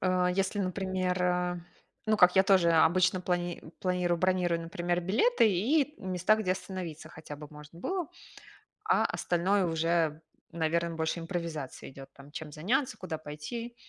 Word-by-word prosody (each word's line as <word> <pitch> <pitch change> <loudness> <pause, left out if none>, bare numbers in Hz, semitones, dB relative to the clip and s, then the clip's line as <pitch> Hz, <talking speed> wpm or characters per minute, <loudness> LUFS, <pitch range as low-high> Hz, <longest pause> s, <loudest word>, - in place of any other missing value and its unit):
а, 185 -1 +2
если, 195 +2 0
например, 185 -1 -1
а, 180 0 0 0.5
ну, 215 0 +3
как 180 -1 +6
я 190 - +8
тоже 190 -3 +4
обычно 175 +3 +4
плани 175 -1 -2 0.2
планирую, 180 -2 0
бронирую, 180 -2 +1
например, 175 +1 -2
билеты 225 - +3
и 275 - +1
места, 185 +3 +2
где 200 -4 0
остановиться 180 -4 -6
хотя 155 -2 -9
бы 150 0 -10
можно 150 +2 -13
было. 365 - -2 0.8
А 440 0 +3
остальное 185 +3 +1
уже, 165 -1 0 0.3
наверно, 170 0 0
больше 160 +1 -1
импровизация 165 -5 -5
идёт, 135 0 -11
там, 140 +1 -15
чем 150 0 -7
заняться, 245 - 0
куда 175 -4 -5
пойти. 155 +11 -7
180 Hz, 145 wpm, -30 LUFS, 165-190 Hz, 0.8 s, я